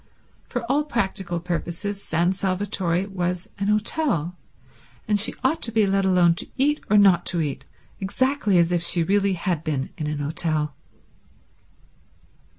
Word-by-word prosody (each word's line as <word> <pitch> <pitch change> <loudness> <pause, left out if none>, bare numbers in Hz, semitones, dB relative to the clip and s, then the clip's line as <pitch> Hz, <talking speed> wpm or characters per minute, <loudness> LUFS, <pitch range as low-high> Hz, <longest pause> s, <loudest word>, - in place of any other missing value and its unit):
For 245 -2 -3
all 275 +5 +1
practical 190 - -2
purposes 175 +4 -4
San 170 +2 +1
Salvatore 190 -2 0
was 180 0 -2
an 200 - -1
hotel, 210 - 0 0.7
and 210 -1 +2
she 210 - +3
ought 275 +5 +1
to 230 - -2
be 220 -1 +3
let 195 0 +1
alone 180 -2 +4
to - - -3
eat 295 +3 +2
or 210 - +5
not 190 -4 +5
to 175 - 0
eat 140 -3 -3 0.3
exactly 215 0 +1
as 170 0 +3
if 175 -1 +1
she 170 0 +1
really 200 +2 +2
had 170 -3 -2
been 145 -5 -2
in 155 - -2
an 150 0 -2
hotel. 150 0 -2
185 Hz, 155 wpm, -24 LUFS, 170-205 Hz, 0.7 s, or